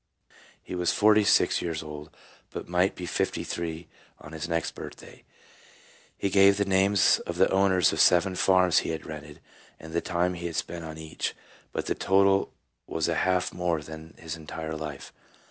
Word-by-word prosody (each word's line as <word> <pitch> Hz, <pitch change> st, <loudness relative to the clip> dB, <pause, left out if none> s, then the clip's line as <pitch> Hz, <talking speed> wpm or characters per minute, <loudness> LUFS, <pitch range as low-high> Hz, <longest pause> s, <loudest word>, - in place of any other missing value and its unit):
He -, -, -8 dB
was 90 Hz, -1 st, +1 dB
forty 105 Hz, 0 st, +4 dB
six -, -, +3 dB
years 80 Hz, -2 st, -3 dB
old, 75 Hz, 0 st, -8 dB, 0.4 s
but -, -, -7 dB
might 90 Hz, +2 st, +1 dB
be 90 Hz, -, -6 dB
fifty -, -, -1 dB
three 85 Hz, -1 st, -5 dB, 0.3 s
on 75 Hz, -, -12 dB
his 80 Hz, +2 st, -5 dB
next 85 Hz, -1 st, -1 dB
birthday. -, -, -11 dB, 0.9 s
He 100 Hz, -, -1 dB
gave 100 Hz, 0 st, +6 dB
the 100 Hz, -, +1 dB
names 95 Hz, +1 st, +3 dB
of -, -, -4 dB
the -, -, +5 dB
owners 95 Hz, -3 st, +3 dB
of -, -, -3 dB
seven 90 Hz, +2 st, +4 dB
farms 90 Hz, -1 st, +4 dB
he -, -, -4 dB
had 80 Hz, -2 st, -4 dB
rented 75 Hz, -1 st, -9 dB, 0.4 s
and 80 Hz, 0 st, -11 dB
the 85 Hz, -, +1 dB
time 90 Hz, +1 st, 0 dB
he 85 Hz, -1 st, -5 dB
had 85 Hz, -, -6 dB
spent 85 Hz, -1 st, -4 dB
on 80 Hz, -1 st, -8 dB
each, 80 Hz, 0 st, -4 dB, 0.4 s
but -, -, -3 dB
the -, -, 0 dB
total 95 Hz, 0 st, +2 dB, 0.4 s
was 80 Hz, -1 st, -1 dB
a 85 Hz, -, +1 dB
half 90 Hz, +2 st, +1 dB
more 85 Hz, -3 st, -1 dB
than 80 Hz, +1 st, -10 dB
his 80 Hz, -1 st, -6 dB
entire 80 Hz, 0 st, -6 dB
life. 75 Hz, -3 st, -7 dB
85 Hz, 180 wpm, -27 LUFS, 80-95 Hz, 0.9 s, gave